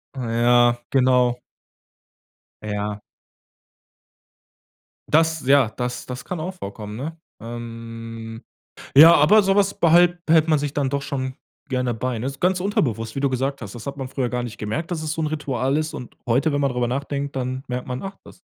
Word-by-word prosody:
Ah 130 - -4
ja, 120 +1 +4
genau. 125 -2 +3 1.2
Ja. 105 0 -3 2.1
Das 160 -1 +2
ja, 135 -4 +5
das 125 +2 -4
das 125 0 -6
kann 180 - -4
auch 180 +4 -4
vorkommen, 105 - -7
ne? 155 +7 -5 0.2
Ähm, 115 -1 -8 0.5
ja, 160 +4 +10
aber 185 +9 +6
so 195 +1 +2
was 200 -1 +3
behal 175 +1 +5
behält 160 0 +4
man 155 -2 +3
sich 145 -1 -3
dann 140 -2 0
doch 140 0 -1
schon 130 -2 -4 0.3
gerne 125 -2 0
bei, 120 +1 -3
ne? 120 - -4
Ist 140 0 -7
ganz 180 +1 +2
unterbewusst, 115 - -1
wie 135 - -2
du 140 - +2
gesagt 135 +1 -2
hast. 100 -2 -7
Das 120 +3 -8
hat 140 - -5
man 135 -2 -4
früher 130 -3 -2
gar 125 0 -2
nicht 115 -3 -7
gemerkt, 130 +12 -4
dass 165 -3 -2
es 155 0 -2
so 160 - -3
'n 155 - 0
Ritual 140 -3 -1
ist. 155 0 -2
Und 125 - -9
heute, 135 +7 +2
wenn 145 0 0
man 140 -2 +1
drüber 125 -1 0
nachdenkt, 140 +2 -3
dann 130 0 -3
merkt 125 0 -4
man, 125 0 -4
ach, 195 0 -6
das - - -15
130 Hz, 190 wpm, -22 LUFS, 120-155 Hz, 2.1 s, ja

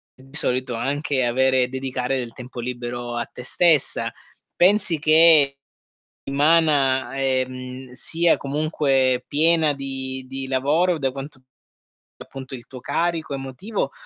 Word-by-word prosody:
di 135 +2 -14
solito 125 -3 0
anche 140 +2 -1
avere 130 +1 +2
dedicare 130 0 -2
del 120 -2 -6
tempo 125 -1 -10
libero 120 0 -5
a 120 - -2
te 125 - -11
stessa. 160 +1 +2 0.4
Pensi 180 -3 +3
che 155 -3 +6 0.7
settimana, 140 -3 +2
ehm, 130 -1 -3
sia 165 +5 +1
comunque 135 -3 0
piena 160 0 +3
di 130 -1 -5
di 135 0 -6
lavoro 150 +7 +1
da 135 -1 0
quanto 135 0 -9 0.8
appunto 130 0 -9
il 120 - -11
tuo 130 - -10
carico 165 -2 -2
emotivo 135 - -4
135 Hz, 120 wpm, -22 LUFS, 130-150 Hz, 0.8 s, che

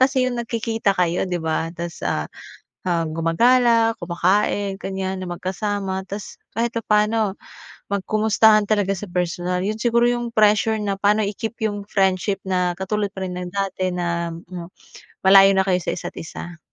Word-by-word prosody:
kasi 260 0 +3
yung 245 -1 -2
nagkikita 225 -3 -1
kayo, 175 0 +1
'di 180 - -1
ba? 160 0 -1
Tas, 170 -1 -6
ah, 75 - -1 0.6
ah, 170 -2 +1
gumagala, 230 +8 +3
kumakain, 195 +3 0
ganyan 190 -1 -4
na - - -6
magkasama. 190 +1 -3
Tas 200 +1 -7 0.2
kahit 235 +2 -1
papaano 210 -2 +1 0.6
magkumustahan 215 +1 +3
talaga 205 -2 +1
sa 210 - -6
personal. 180 0 -1
Yun 215 +2 -2
siguro 235 +1 +3
yung 240 -1 -1
pressure 215 +1 +3
na 200 -1 -1
paano 210 +2 +3
i-keep 220 +3 -4
yung 205 -2 -2
friendship 195 0 +1
na 180 -1 +1
katulad 205 +2 -1
pa 190 - -7
rin 180 0 -5
ng 180 0 -5
dati 190 -2 -1
na, 170 -1 -2
hmm, 170 0 -8 0.6
malayo 195 0 +8
na 190 - +3
kayo 180 -1 +2
sa - - -4
isa't - - -6
isa. 165 0 -8
195 Hz, 160 wpm, -22 LUFS, 180-215 Hz, 0.6 s, malayo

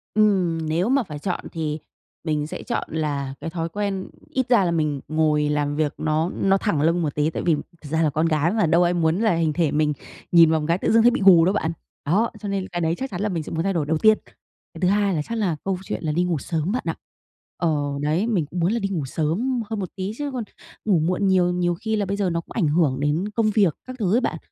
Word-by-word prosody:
Ừm, 195 -6 +3
nếu 170 +7 +1
mà 270 0 +3
phải 150 -7 -8
chọn 180 +4 -2
thì 155 -2 -3 0.4
mình 150 -2 -1
sẽ - - -7
chọn - - -3
là 145 -4 -2
cái 165 - -4
thói 165 0 -3
quen 200 0 -3 0.2
ít 260 -2 -1
ra 235 -6 +5
là 170 - +1
mình 150 -4 0
ngồi 155 -1 +1
làm 145 -1 0
việc 150 -1 0
nó 155 +2 0
nó 195 0 +2
thẳng 190 -8 0
lưng 165 +3 +2
một 150 -4 -2
tí 150 +1 +1
tại - - -4
vì 165 -3 +4
thật 155 0 -10
ra 160 +2 +1
là 155 - +3
con 155 +3 0
gái 160 +1 +2
mà, 215 -2 +2
đâu 170 +2 +4
ai 175 0 +2
muốn 165 +1 +1
là 220 -6 +2
hình 160 -2 +1
thể 160 -2 +1
mình 150 0 +1 0.4
nhìn 165 -2 +7
vào 160 - +2
một 150 - -3
cái 170 - +3
tự - - 0
dưng 230 - +5
thấy 240 +2 +6
bị 255 - -2
gù 175 -4 +8
đâu 190 - +2
bạn, 165 -6 0 0.3
đó, 205 +10 +2
cho 210 - -6
nên 195 -1 -2
cái 175 -1 -4
đấy 165 +1 +1
chắc 265 -4 -5
chắn 180 - -4
là 210 - 0
mình 165 -4 -2
sẽ - - -8
muốn 165 0 -1
thay 195 +1 0
đổi 155 -4 0
đầu 160 +1 0
tiên. 215 +5 +5 0.6
Cái - - -10
thứ 180 - +3
hai 200 0 +2
là 155 - 0
chắc 230 +9 -4
là 185 -7 0
câu 195 -1 -1
chuyện - - -5
là 155 - 0
đi 175 +3 +1
ngủ 175 -3 0
sớm 160 +5 -2
bạn 250 - -1
ạ. - - -1 0.6
Ờ, 170 - +1 0.3
đấy, 155 +9 +1
mình 195 -10 +1
cũng 170 +5 -6
muốn 170 +3 +2
là 235 - 0
đi 195 - -2
ngủ 165 -8 -2
sớm 200 - -1
hơn 220 -2 -3
một 185 - -4
tí 190 +1 -3
chứ 290 -1 -3
còn 245 -3 -2 0.4
ngủ 190 -6 +3
muộn 180 +5 0
nhiều, 180 -2 +3
nhiều 175 -1 0
khi 220 +5 -2
là 205 -2 0
bây 200 +1 -2
giờ 195 -3 +1
nó 170 0 -1
cũng - - -23
ảnh 185 -9 +1
hưởng 145 -4 +2
đến 155 +8 0
công 215 0 +1
việc 200 -7 +3
các 255 - -6
thứ 195 -2 +1
ấy 245 - +3
bạn, - - -1
175 Hz, 280 wpm, -23 LUFS, 155-200 Hz, 0.6 s, gù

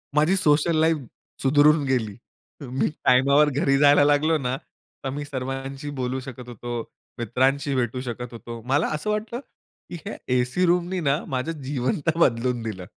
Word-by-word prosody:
माझी 155 +6 +4
social 160 -1 +3
life 160 0 +3 0.4
सुधारून 145 +2 +4
गेली. 115 -6 -1 0.5
मी 130 0 -1 0.2
टाइमावर 140 +4 +5
घरी 135 0 +2
जायला 145 0 +6
लागलो 150 +2 +3
ना, 130 -2 -2 0.5
तर 135 - -2
मी 145 +2 -4
सर्वांशी 135 +1 -5
बोलू 130 +1 -1
शकत 125 -1 -9
होतो, 120 0 -5 0.4
मित्रांशी 135 +5 +1
भेटू 125 0 -1
शकत 125 -1 -6
होतो. 115 0 -8
मला 145 +4 +2
असं 155 +8 -4
वाटलं, 215 +3 -2 0.5
की - - -6
ह्या - - -5 0.2
एसी 125 +9 +1
रूमनी 180 +1 +1
ना, 145 -2 +1
माझं 130 +5 -2
जीवन 135 - -1
तर 165 0 +2
बदलून 120 -3 +2
दिलं. 95 -5 -5
135 Hz, 155 wpm, -24 LUFS, 125-150 Hz, 0.5 s, जायला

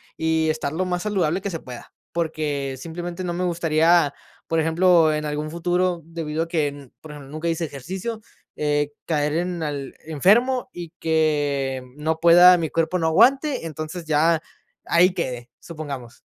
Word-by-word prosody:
y 160 0 +1
estar 155 -2 -2
lo 185 +4 -1
más 180 -1 -2
saludable 190 -4 0
que 200 - -3
se 165 -3 -4
pueda. 125 -2 -11 0.2
Porque, 150 -5 -2
simplemente, 175 +4 -6
no 175 -1 -2
me 180 +1 -2
gustaría, 165 -2 +3 0.3
por 165 0 +1
ejemplo, 165 0 +4
en 150 0 -2
algún 150 +1 -3
futuro, 175 +1 0
debido 165 -1 -3
a - - -7
que, 160 -3 0
n 140 -3 -9
por 155 - -11
ejemplo, 145 -2 -11
nunca 155 +2 -4
hice 165 0 -1
ejercicio, 190 - -6 0.3
eh, 145 -1 0
caer 150 -2 0
en 175 0 -2
al 140 -3 -4
enfermo 235 - +2
y 170 -2 -8
que 145 -5 0
no 160 +2 -2
pueda 175 +2 +8
mi 160 -3 -2
cuerpo 165 +3 0
no 160 - +1
aguante, 265 - +3
entonces 155 +2 -6
ya 160 +1 +2 0.4
ahí 180 +2 +4
quede, 125 -8 -4
supongamos. 140 -7 -8
160 Hz, 165 wpm, -23 LUFS, 150-175 Hz, 0.4 s, pueda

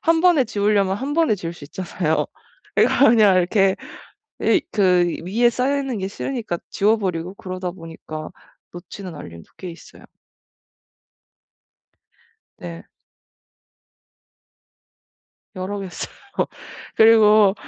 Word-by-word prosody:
1 330 0 +3
번에 340 -6 +5
지우려면 200 -3 +1
1 275 +6 -3
번에 325 -9 +3
지울 170 -3 -6
수 160 - -11
있잖아요. 165 0 -2 0.5
그래서 280 - +5
그냥 215 -5 +5
이렇게 190 +2 +3 0.7
이 - - +4
그 180 -3 +3 0.2
위에 230 +6 +3
쌓여 265 +4 0
있는 270 -5 -3
게 190 - -3
싫으니까 215 -3 -4
지워 215 +3 +2
버리고 180 -3 -3
그러다 185 -2 -5
보니까 165 -3 -9 0.4
놓치는 175 +1 -9
알림도 85 - -11
꽤 185 - -7
있어요. 165 - -14 2.5
네. 85 -1 -8 2.7
여러 190 +2 -4
개 195 - -5
써요. - - -5 0.5
그리고 215 -2 +6
195 Hz, 225 characters per minute, -21 LUFS, 175-225 Hz, 2.7 s, 그리고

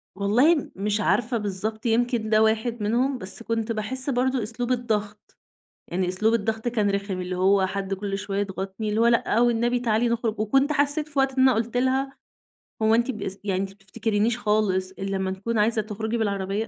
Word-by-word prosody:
والله 220 - +4
م 295 - -4
مش 205 +2 0
عارفة 240 +2 +1
بالضبط 215 +2 -3
يمكن 235 -1 +1
ده 215 0 +5
واحد 220 +1 0
منهم، 250 +5 +1
بس 195 +2 -4
كنت 230 0 -2
باحس 255 +5 -2
برضه 255 -1 +1
أسلوب 235 +3 -1
الضغط، 210 -4 -3 0.5
يعني 180 +1 -1
أسلوب 215 +5 +2
الضغط 220 +1 -1
كان 215 -4 +1
رخم، 200 -1 -2
اللي 180 0 -4
هو 190 +1 +3
حد 195 0 -3
كل 195 0 -4
شوية 200 0 -3
يضغطني، 195 +1 -4
اللي 210 +1 0
هو 230 - +4
"لأ 235 -1 +2
والنبي 240 +1 +2
تعالي 235 0 +1
نخرج." 230 -2 -1
وكنت 270 +7 +2
حسّيت 290 +1 +1
في 295 -2 -6
وقت 270 0 +3
إن 260 - +5
أنا 260 -1 +5
قُلت 230 +2 -2
لها: 265 +2 0 0.7
"هو 220 +1 +4
أنتِ 240 +3 +1
بس 200 -4 -6
يعني 190 -2 -1
أنتِ 195 - -3
ما 195 - -16
بتفتكرينش 215 +3 -1
خالص 210 -4 +1
الّا 195 0 -3
ما 190 0 -1
نكون 210 +5 -3
عايزة 220 +1 +2
تخرجي 220 +2 -3
بالعربية؟! 200 0 -1
220 Hz, 195 wpm, -25 LUFS, 200-240 Hz, 0.7 s, ده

